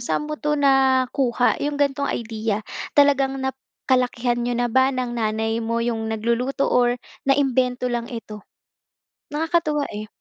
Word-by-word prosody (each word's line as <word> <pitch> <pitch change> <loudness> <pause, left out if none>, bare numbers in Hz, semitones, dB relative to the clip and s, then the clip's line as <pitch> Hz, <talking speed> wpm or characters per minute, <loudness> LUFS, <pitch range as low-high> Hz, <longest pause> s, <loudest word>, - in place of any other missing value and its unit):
saan 240 +4 -1
mo 305 - -2
'to 295 0 0
nakuha, 265 -3 +2
yung 290 0 -1
ganitong 280 0 0
idea? 220 -2 -3 0.3
Talagang 275 -2 +4
nakalakihan 255 -2 -1
niyo 240 0 -1
na 245 0 +1
ba 260 +1 +4
ng 250 -1 -2
nanay 220 0 -1
mo 230 +1 -1
yung 225 -2 -2
nagluluto 235 +5 0
or 245 -1 +3 0.3
naimbento 260 -2 +2
lang 235 -1 -2
ito? 215 -3 -7 0.9
Nakakatuwa, 310 -2 0
eh. 215 +1 -6
250 Hz, 135 wpm, -22 LUFS, 235-275 Hz, 0.9 s, Talagang